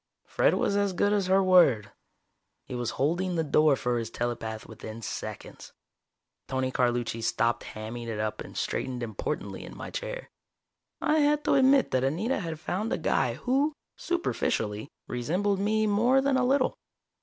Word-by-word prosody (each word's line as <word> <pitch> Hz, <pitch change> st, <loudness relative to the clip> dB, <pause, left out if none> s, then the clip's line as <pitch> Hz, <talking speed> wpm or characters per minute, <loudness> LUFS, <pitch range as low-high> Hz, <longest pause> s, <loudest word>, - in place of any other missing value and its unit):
Fred -, -, +2 dB
was 200 Hz, -, +1 dB
as 200 Hz, -1 st, +1 dB
good 205 Hz, +3 st, +2 dB
as 200 Hz, -3 st, +1 dB
her 190 Hz, +1 st, +4 dB
word. 175 Hz, -, +5 dB, 0.7 s
He -, -, -8 dB
was 120 Hz, -2 st, -2 dB
holding 175 Hz, +6 st, 0 dB
the 165 Hz, -, +1 dB
door 150 Hz, -1 st, +4 dB
for 125 Hz, -2 st, -1 dB
his 115 Hz, -1 st, -4 dB
telepath 115 Hz, -2 st, -4 dB
within 110 Hz, 0 st, -9 dB
seconds. -, -, -7 dB, 0.7 s
Tony 130 Hz, -1 st, -1 dB
Carlucci 120 Hz, -2 st, 0 dB
stopped 115 Hz, +1 st, +1 dB
hamming 115 Hz, +2 st, -6 dB
it 110 Hz, -2 st, -3 dB
up 110 Hz, 0 st, -2 dB
and -, -, -9 dB
straightened 125 Hz, -2 st, -2 dB
importantly 110 Hz, -3 st, -4 dB
in -, -, -10 dB
my -, -, -7 dB
chair. -, -, -5 dB, 0.7 s
I 310 Hz, +1 st, +3 dB
had 295 Hz, 0 st, +3 dB
to -, -, +2 dB
admit 270 Hz, 0 st, +5 dB
that 130 Hz, 0 st, +1 dB
Anita 175 Hz, -, 0 dB
had 165 Hz, -5 st, -5 dB
found 195 Hz, +7 st, -2 dB
a -, -, +1 dB
guy -, -, +1 dB
who, 275 Hz, +4 st, +1 dB, 0.2 s
superficially, 110 Hz, -, -1 dB, 0.2 s
resembled 180 Hz, +11 st, 0 dB
me 215 Hz, +2 st, +2 dB
more 230 Hz, +6 st, +4 dB
than 275 Hz, 0 st, +2 dB
a 260 Hz, -, +3 dB
little. 270 Hz, 0 st, +2 dB
165 Hz, 165 wpm, -28 LUFS, -, 0.7 s, word